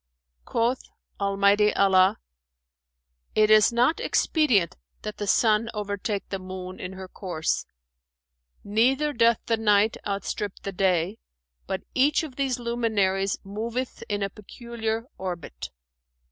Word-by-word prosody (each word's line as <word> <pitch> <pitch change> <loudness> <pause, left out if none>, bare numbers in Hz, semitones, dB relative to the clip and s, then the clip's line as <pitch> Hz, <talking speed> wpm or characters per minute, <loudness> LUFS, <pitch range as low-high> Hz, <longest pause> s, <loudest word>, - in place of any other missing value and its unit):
Quoth 235 +3 0 0.4
Almighty 200 +1 +3
Allah, 190 -1 +4 1.2
'It 215 0 +4
is 215 +1 +7
not 245 +7 +2
expedient 215 - +2 0.3
that 215 0 -5
the 205 - -4
sun 220 +2 +3
overtake 205 -1 -3
the 195 - -3
moon 185 0 -7
in 185 +1 -6
her 190 0 -8
course; 175 -4 -2 1.0
neither 260 +8 +2
doth 235 -1 +4
the 230 - +1
night 210 0 +3
outstrip 200 0 -3
the 195 - -3
day, 185 +1 +1 0.5
but 190 - -3
each 285 +5 +3
of 290 -5 -7
these 270 -2 0
luminaries 215 -5 0
moveth 230 +5 -4
in 205 -1 -1
a 195 - -1
peculiar 225 +1 -5
orbit.'" 175 - -5
210 Hz, 120 wpm, -26 LUFS, 195-235 Hz, 1.2 s, is